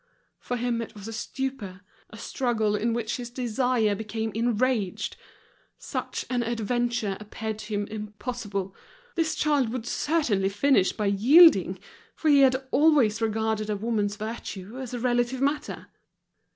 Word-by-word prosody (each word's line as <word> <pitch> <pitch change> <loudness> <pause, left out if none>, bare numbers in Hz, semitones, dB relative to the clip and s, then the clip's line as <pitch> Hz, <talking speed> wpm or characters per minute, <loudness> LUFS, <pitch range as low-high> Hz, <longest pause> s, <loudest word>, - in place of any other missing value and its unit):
For 245 - -3
him 235 -1 -1
it 230 - -8
was 205 0 -9
a 225 - -6
stupor, 220 -4 -5 0.3
a 220 - -11
struggle 220 -2 0
in 230 +3 0
which 230 -1 -2
his 245 -1 -6
desire 245 -2 +1
became 220 +2 -3
enraged. 230 -3 0 0.6
Such - - -4
an 245 -1 0
adventure 235 -2 -1
appeared 215 +1 -5
to 215 0 -5
him 205 0 -1
impossible, 210 -2 -5 0.4
this 325 -3 0
child 290 -6 +2
would 240 -1 -4
certainly 240 -10 +1
finish 205 -1 +3
by 210 - -3
yielding, 205 - +6 0.4
for 315 - 0
he 285 -1 +6
had 265 0 +3
always 280 -8 +4
regarded 220 -1 0
a 210 - 0
woman's 205 -1 -1
virtue 215 0 -6
as 260 -3 -6
a - - -3
relative 245 +1 +1
matter. 285 +2 -1
230 Hz, 145 wpm, -26 LUFS, 210-255 Hz, 0.6 s, yielding